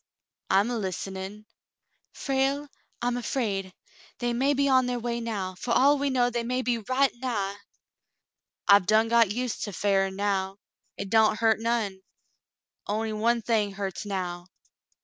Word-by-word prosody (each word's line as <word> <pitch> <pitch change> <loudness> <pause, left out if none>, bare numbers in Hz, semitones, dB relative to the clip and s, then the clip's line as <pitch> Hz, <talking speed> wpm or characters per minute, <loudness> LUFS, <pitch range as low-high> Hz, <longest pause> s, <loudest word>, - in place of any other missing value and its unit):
"I'm 200 +5 +3
a 235 - -1
hstenin'." 195 +2 -5 0.7
"Frale, 275 +1 -1 0.4
I'm 245 0 0
afraid. 210 -6 -2 0.5
They 240 0 -1
may 270 +4 +2
be 280 +1 +2
on 260 -2 +4
their 250 0 -1
way 235 0 -2
now. 205 -5 -3
For 235 +6 -3
all 280 +3 +5
we 285 0 0
know 245 -2 +2
they 240 0 -1
may 250 +2 -1
be 240 -1 0
right 260 +5 +1
nigh." 205 -6 -2 1.1
"I've 200 -2 +6
done 220 +1 +4
got 230 -3 +5
used 245 +2 -2
to 205 - -6
fearin' 195 0 +1
now. 195 -1 -1 0.4
Hit 200 0 -6
don't 220 -1 +4
hurt 220 -1 +3
none. 225 -4 -1 0.9
On'y 220 +1 -1
one 230 +2 +1
thing 210 -3 +1
hurts 195 -2 -4
now." 180 -3 -4
225 Hz, 150 wpm, -27 LUFS, 200-245 Hz, 1.1 s, I've